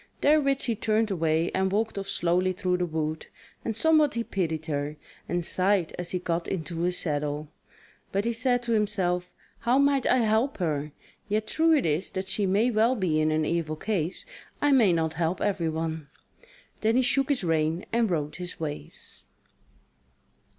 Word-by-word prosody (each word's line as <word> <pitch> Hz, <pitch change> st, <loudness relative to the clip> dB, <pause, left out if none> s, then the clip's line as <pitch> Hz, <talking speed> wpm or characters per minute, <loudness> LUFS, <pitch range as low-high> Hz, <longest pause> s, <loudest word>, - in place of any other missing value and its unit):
Therewith 280 Hz, -2 st, +3 dB
she 235 Hz, -, 0 dB
turned 215 Hz, 0 st, +1 dB
away 165 Hz, -2 st, +1 dB
and 190 Hz, 0 st, 0 dB
walked 220 Hz, +3 st, 0 dB
off 195 Hz, -1 st, -4 dB
slowly 180 Hz, +2 st, +1 dB
through 180 Hz, 0 st, 0 dB
the 180 Hz, 0 st, -1 dB
wood, 155 Hz, -1 st, -3 dB, 0.4 s
and 225 Hz, -, -2 dB
somewhat 310 Hz, +1 st, +4 dB
he 235 Hz, -, 0 dB
pitied 160 Hz, -7 st, -2 dB
her, 145 Hz, -1 st, -2 dB, 0.3 s
and 175 Hz, -1 st, -1 dB
sighed 185 Hz, -2 st, +1 dB
as 175 Hz, -1 st, -3 dB
he 185 Hz, -, -1 dB
got 170 Hz, -1 st, -2 dB
into 170 Hz, -2 st, -4 dB
his 180 Hz, +1 st, 0 dB
saddle; 150 Hz, -1 st, -2 dB, 0.6 s
but 200 Hz, +2 st, 0 dB
he 235 Hz, -, +1 dB
said 245 Hz, +1 st, +1 dB
to 235 Hz, -, -3 dB
himself: 190 Hz, -5 st, 0 dB, 0.3 s
"How 245 Hz, +2 st, +2 dB
might 280 Hz, -1 st, +3 dB
I -, -, +4 dB
help 225 Hz, +3 st, +1 dB
her? 150 Hz, -4 st, -2 dB, 0.4 s
Yet 215 Hz, +1 st, 0 dB
true 325 Hz, +7 st, +3 dB
it 280 Hz, -, 0 dB
is 160 Hz, +4 st, 0 dB
that 190 Hz, 0 st, -3 dB
she 195 Hz, +1 st, 0 dB
may 210 Hz, +6 st, +2 dB
well 230 Hz, +3 st, +3 dB
be 170 Hz, -8 st, +1 dB
in 155 Hz, -, +2 dB
an 155 Hz, 0 st, +1 dB
evil 165 Hz, -2 st, -1 dB
case: 180 Hz, -1 st, -2 dB, 0.3 s
I 290 Hz, -, +3 dB
may 235 Hz, -8 st, +5 dB
not 160 Hz, -2 st, 0 dB
help 165 Hz, +2 st, -1 dB
everyone." 160 Hz, -4 st, -2 dB, 0.7 s
Then 220 Hz, +1 st, +2 dB
he 255 Hz, -, +4 dB
shook 270 Hz, +2 st, +2 dB
his 275 Hz, -8 st, 0 dB
rein 160 Hz, +1 st, 0 dB
and 230 Hz, -2 st, +2 dB
rode 150 Hz, -4 st, -2 dB
his 180 Hz, -1 st, -7 dB
ways. 150 Hz, -, -7 dB
185 Hz, 180 wpm, -27 LUFS, 160-225 Hz, 0.7 s, may